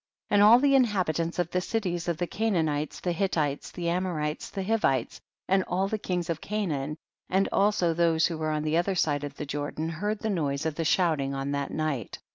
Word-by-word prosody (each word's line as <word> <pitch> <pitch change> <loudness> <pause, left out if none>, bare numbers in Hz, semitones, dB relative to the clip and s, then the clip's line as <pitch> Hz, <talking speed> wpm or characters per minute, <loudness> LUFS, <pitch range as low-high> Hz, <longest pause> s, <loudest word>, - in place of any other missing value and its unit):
8. - - -1
And 205 - +6
all 215 +3 +9
the 275 +2 +3
inhabitants 185 -10 +1
of 175 -1 -1
the 180 - +1
cities 180 -5 -2
of 170 -2 0
the 175 - -1
Canaanites, 160 -8 -1
the 180 - 0
Hittites, 160 -6 -1
the 170 -1 -5
Amorites, 170 -4 -2
the 195 - -4
Hivites 185 - 0 0.3
and 190 0 +3
all 190 +2 0
the 215 +2 -2
kings 180 -4 -2
of 165 -2 -3
Canaan, 155 -9 -2 0.3
and 190 +1 +2
also 195 -4 +2
those 165 -1 +3
who 165 -3 -2
were 155 0 -1
on 155 -1 -1
the 155 +1 +1
other 185 +3 +1
side 145 -4 +1
of 145 -1 -6
the 150 - -5
Jordan, 145 +3 -3
heard 205 +7 -2
the 220 +1 -2
noise 145 -6 -1
of 160 - 0
the 165 +2 -3
shouting 155 -6 +2
on 135 +1 -3
that 140 -1 -2
night. 155 -8 -3
170 Hz, 215 wpm, -27 LUFS, 150-190 Hz, 0.3 s, all